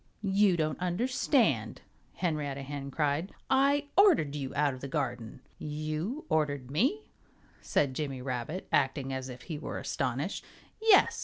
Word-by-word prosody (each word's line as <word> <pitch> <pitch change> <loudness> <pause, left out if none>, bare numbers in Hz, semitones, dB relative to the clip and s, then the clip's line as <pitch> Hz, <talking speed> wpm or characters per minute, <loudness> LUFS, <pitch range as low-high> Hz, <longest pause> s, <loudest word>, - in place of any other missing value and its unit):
"You 195 -2 +3
don't 155 -1 -1
understand," 240 - +1 0.3
Henrietta 145 -5 -2
Hen 140 0 -5
cried. 150 +5 0 0.2
"I 280 +2 +3
ordered 345 - +5
you 135 -3 -4
out 145 -1 +2
of 130 - -9
the 140 - -4
garden." 125 -3 -3 0.2
"You 155 - -3
ordered 145 -5 0
me?" 265 - +1 0.6
said 140 -3 +1
Jimmy 135 -2 -3
Rabbit, 125 +7 -4
acting 135 0 +1
as 130 0 -4
if 125 0 -9
he 155 -4 -5
were - - -5
astonished. 135 +5 -2 0.4
"Yes!" 440 -3 +5
150 Hz, 140 wpm, -30 LUFS, 135-190 Hz, 0.6 s, ordered